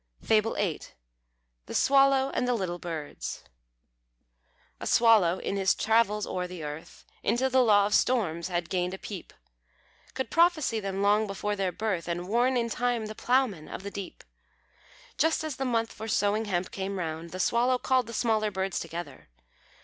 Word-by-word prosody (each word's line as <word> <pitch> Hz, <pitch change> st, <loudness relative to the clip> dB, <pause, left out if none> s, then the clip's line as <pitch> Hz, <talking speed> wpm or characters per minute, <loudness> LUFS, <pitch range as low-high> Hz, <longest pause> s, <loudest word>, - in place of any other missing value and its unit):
FABLE 220 Hz, 0 st, +2 dB
VIII. 190 Hz, -6 st, -1 dB, 0.9 s
THE -, -, -6 dB
SWALLOW 275 Hz, -1 st, +4 dB
AND 250 Hz, -, 0 dB
THE 250 Hz, -, +2 dB
LITTLE 180 Hz, -5 st, -3 dB
BIRDS. 160 Hz, -4 st, -6 dB, 1.4 s
A -, -, -5 dB
Swallow, 215 Hz, -7 st, +5 dB
in 200 Hz, -, -3 dB
his 190 Hz, -1 st, +2 dB
travels 215 Hz, -2 st, +2 dB
o'er 180 Hz, 0 st, -3 dB
the 180 Hz, -3 st, -8 dB
earth, 150 Hz, +2 st, -8 dB, 0.2 s
Into 260 Hz, +2 st, +1 dB
the 260 Hz, 0 st, +5 dB
law 205 Hz, -4 st, +5 dB
of 205 Hz, -, -1 dB
storms 185 Hz, -11 st, +1 dB
had 175 Hz, -2 st, -3 dB
gained 180 Hz, 0 st, -1 dB
a -, -, -9 dB
peep; 195 Hz, -2 st, -8 dB, 0.8 s
Could 260 Hz, -, -3 dB
prophesy 330 Hz, -9 st, +3 dB
them 195 Hz, -1 st, -3 dB
long 210 Hz, +2 st, +3 dB
before 205 Hz, +1 st, -2 dB
their 195 Hz, -2 st, -1 dB
birth, 195 Hz, -5 st, -2 dB
And 175 Hz, +1 st, -3 dB
warn 245 Hz, +5 st, +2 dB
in 235 Hz, -1 st, 0 dB
time 240 Hz, -1 st, -1 dB
the 215 Hz, -, -6 dB
ploughmen 240 Hz, -9 st, 0 dB
of -, -, -7 dB
the 200 Hz, -, -6 dB
deep. 200 Hz, -2 st, -8 dB, 1.0 s
Just 320 Hz, +1 st, +2 dB
as 310 Hz, -3 st, -4 dB
the 270 Hz, -, -2 dB
month 230 Hz, -2 st, 0 dB
for 220 Hz, -, -7 dB
sowing 210 Hz, 0 st, +1 dB
hemp 185 Hz, -3 st, -2 dB
came 195 Hz, 0 st, -4 dB
round, 165 Hz, -1 st, -4 dB
The 185 Hz, -, -7 dB
Swallow 245 Hz, +6 st, +2 dB
called 255 Hz, -1 st, +1 dB
the 230 Hz, -, -8 dB
smaller 220 Hz, -2 st, +1 dB
birds 190 Hz, -2 st, -2 dB
together. 165 Hz, -, -7 dB
210 Hz, 170 wpm, -28 LUFS, 180-240 Hz, 1.4 s, Swallow